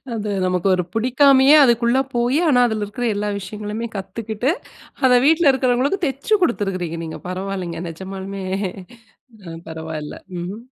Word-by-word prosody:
அது 215 -1 -3 0.2
நமக்கு 180 0 0
ஒரு 180 - 0
புடிக்காமயே 265 +4 +5
அதுக்குள்ள 235 +1 +3 0.2
போயி, 240 +4 +1
ஆனா 250 -4 +4
அதில 220 -2 -2
இருக்கிற 210 +4 -5
எல்லா 210 +1 -2
விஷயங்களுமே 210 +3 -5
கத்துக்கிட்டு 215 +5 -3 0.5
அத 255 - +6
வீட்ல 320 0 +5
இருக்கிறவங்களுக்கும் 265 +8 +1
தச்சு 275 - -1
குடுத்திருக்கிறீங்க 185 - -1
நீங்க. 160 - -7
பரவாயில்லைங்க. 185 -2 -4
நெஜமாலுமே 190 +3 -7 1.0
அ 165 -1 -7
பரவாயில்லை. 160 -2 -6 0.2
ம், 175 +1 -4
ம். 225 - -11
210 Hz, 135 wpm, -20 LUFS, 185-250 Hz, 1.0 s, அத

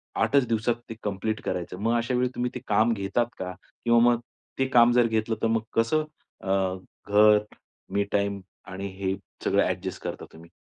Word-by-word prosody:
8चं 140 -3 +3
दिवसात 115 +1 +1
ते 115 - -6
कंप्लीट 105 +2 -2
करायचं. 90 0 -3
मग 115 +3 +1
अशा 115 +2 -1
वेळी 125 0 +1
तुम्ही 125 0 -1
ते - - -3
काम 110 +3 +3
घेतात 100 +3 0
का? 90 0 -4 0.3
किंवा 120 0 +5
मग 120 - +1 0.4
ते 135 - +2
काम 120 -2 +6
जर 120 -1 +4
घेतलं 110 0 0
तर - - +4
मग 115 0 +1
कसं 135 +8 +2 0.4
अ, 95 -1 +1 0.3
घर 105 +1 +6 0.5
मी 100 - +2
टाईम 100 -1 0 0.3
आणि 95 +1 -4
हे 95 -1 0 0.3
सगळं - - +3
ॲडजस्ट - - -3
करता - - -5
तुम्ही? 80 +1 -14
110 Hz, 180 wpm, -26 LUFS, 100-120 Hz, 0.5 s, काम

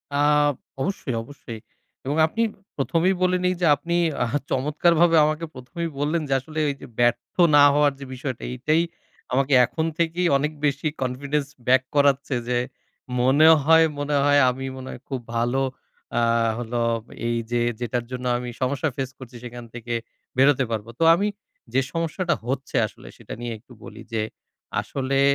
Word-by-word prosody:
আ - - +1 0.6
অবশ্যই, 150 -9 -2
অবশ্যই 115 -4 -10 0.5
এবং 145 +3 -1
আপনি 220 +9 -2 0.4
১ম 165 +4 0
এই 190 - +2
বলে 180 0 +3
নেই 180 - +3
যে 175 - +3
আপনি 170 +3 -3 0.3
আ - - +1 0.2
চমৎকারভাবে 165 +5 +3
আমাকে 155 +2 -1
১ম 130 +5 -13
এই 165 - -1
বললেন 155 +3 0
যে - - +2
আসলে 155 +4 -6
এই 140 - -2
যে - - -9
ব্যর্থ 120 0 +1 0.2
না 145 - +8
হওয়ার 145 -1 +4
যে 140 - -7
বিষয়টি 130 -1 -5
এইটাই 155 +6 +1 0.5
আমাকে 135 +2 +2
এখন 160 +6 -2
থেকেই 170 +1 +1
অনেক 150 +2 -1
বেশি 145 +2 0
কনফিডেন্স 140 +3 -1 0.2
ব্যাক 130 0 +5
করাচ্ছে। 140 -1 +3
যে 120 - +2 0.6
মনে 140 +5 +5 0.2
হয়, 160 +1 +6
মনে 145 0 -1
হয় 145 0 +5
আমি 135 +1 -4
মনে 130 0 -8
হয় 125 - -9
খুব 135 -2 -2 0.2
ভালো 120 +3 +1 0.6
আ - - +2 0.4
হলো 120 0 -2 0.5
এই 120 0 0
যে 120 - +1 0.2
যেটার 120 0 -2
জন্য 125 0 -5
আমি 125 0 -5
সমস্যা 140 +4 0
ফেস 130 -2 -3
করছি 125 -1 -12
সেখান 120 0 -8
থেকে 120 0 -5 0.4
বেরোতে 135 0 +5
পারবো। 110 0 -3
তো - - +2
আমি 200 +4 0 0.5
যে 135 - +4
সমস্যাটা 165 +2 -1
হচ্ছে 135 +1 -3
আসলে - - -15
সেটা - - -9
নিয়ে 120 -1 -3
একটু 125 +2 -18
বলি 110 0 -10
যে, 110 - +1 0.6
আসলে 135 0 -2
135 Hz, 170 wpm, -24 LUFS, 125-155 Hz, 0.6 s, না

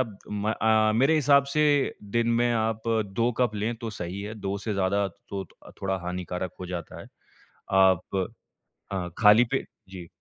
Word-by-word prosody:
अब 110 -6 -3
म 105 +1 -1
अ 110 -1 +3
अ, - - +1
मेरे 135 +8 +4
हिसाब 140 -2 +5
से 150 - +3 0.5
दिन 115 0 +2
में 120 0 +2
आप 110 -1 -1
2 115 +1 +1
कप 120 -4 +2
लें 110 +3 -1
तो 115 -1 -5
सही 90 +3 -4
है। 105 +2 -6
2 100 +1 -2
से 105 +2 -3
ज़्यादा 100 +1 +1
तो 100 -1 -6
थो - - -18
थोड़ा 95 0 0
हानिकारक 90 0 -4
हो 90 - -5
जाता 85 -2 -6
है, - - -11 0.7
आप 95 -2 +5 0.9
हाँ, 90 -3 -3
खाली 110 +2 +7
पेट - - -1 0.2
जी। 90 -3 -9
105 Hz, 180 wpm, -26 LUFS, 95-115 Hz, 0.9 s, खाली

